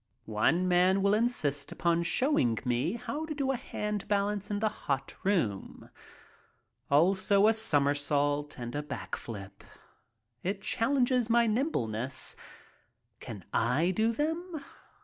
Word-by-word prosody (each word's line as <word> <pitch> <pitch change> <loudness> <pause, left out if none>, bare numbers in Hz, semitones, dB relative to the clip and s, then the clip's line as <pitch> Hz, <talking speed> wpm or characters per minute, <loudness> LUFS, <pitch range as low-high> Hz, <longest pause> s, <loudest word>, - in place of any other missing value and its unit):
One 120 +12 +1
man 185 +2 +3
will 200 0 +4
insist 155 - 0
upon 170 0 +1
showing 170 - +2
me 125 - 0
how 295 +7 -4
to 305 - -4
do 275 -2 0
a - - 0
hand 210 -4 -4
balance 205 0 0
in 205 - -1
the 215 - +2 0.2
hot 135 -1 -1
room. 155 - -1 1.0
Also 190 +7 +4
a 220 - +5
somersault 145 -6 +1
and 120 -1 -6
a 145 - -2
back 150 - -5
flip. 100 -3 -9 0.8
It 195 +2 -3
chal 230 +5 0
lenges 250 -3 +2
my 235 0 +4
nimbleness. 135 - 0 0.8
Can 100 -6 -9
I 140 +10 +2
do 220 +4 +1
them? 320 +3 -3
185 Hz, 130 wpm, -30 LUFS, 140-225 Hz, 1.0 s, a